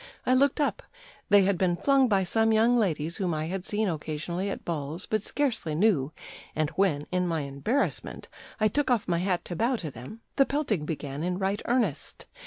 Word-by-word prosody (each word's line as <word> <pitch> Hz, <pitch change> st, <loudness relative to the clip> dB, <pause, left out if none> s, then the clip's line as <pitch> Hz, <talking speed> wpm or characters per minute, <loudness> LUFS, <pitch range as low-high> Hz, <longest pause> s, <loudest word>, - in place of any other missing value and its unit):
I 255 Hz, -, +3 dB
looked 275 Hz, +2 st, +3 dB
up; 290 Hz, -, 0 dB, 0.5 s
they 205 Hz, -1 st, +7 dB
had 190 Hz, -2 st, +1 dB
been 180 Hz, -2 st, +2 dB
flung 275 Hz, +4 st, +4 dB
by 200 Hz, -4 st, +2 dB
some 225 Hz, +4 st, +2 dB
young 225 Hz, +3 st, +4 dB
ladies 170 Hz, -7 st, 0 dB
whom 180 Hz, -6 st, -1 dB
I 155 Hz, 0 st, -2 dB
had 180 Hz, +2 st, -3 dB
seen 215 Hz, 0 st, 0 dB
occasionally 165 Hz, +3 st, -3 dB
at -, -, -5 dB
balls, 160 Hz, +1 st, -4 dB
but 215 Hz, -1 st, 0 dB
scarcely 225 Hz, -, -1 dB
knew, 160 Hz, -7 st, +2 dB, 0.4 s
and 155 Hz, -1 st, 0 dB
when, 165 Hz, -7 st, +1 dB
in 180 Hz, 0 st, +1 dB
my 165 Hz, -2 st, 0 dB
embarrassment, 140 Hz, -, -2 dB, 0.3 s
I 215 Hz, -, +4 dB
took 290 Hz, +7 st, 0 dB
off 240 Hz, -4 st, +1 dB
my 170 Hz, -2 st, +1 dB
hat 180 Hz, -1 st, -1 dB
to 175 Hz, -, -5 dB
bow 235 Hz, +8 st, +1 dB
to 165 Hz, -10 st, -5 dB
them, 130 Hz, -, -10 dB, 0.2 s
the 275 Hz, -, +6 dB
pelting 220 Hz, -, -1 dB
began 145 Hz, -2 st, -4 dB
in 180 Hz, +2 st, -1 dB
right 195 Hz, +2 st, -1 dB
earnest. 230 Hz, -, 0 dB
190 Hz, 195 wpm, -27 LUFS, 160-225 Hz, 0.5 s, they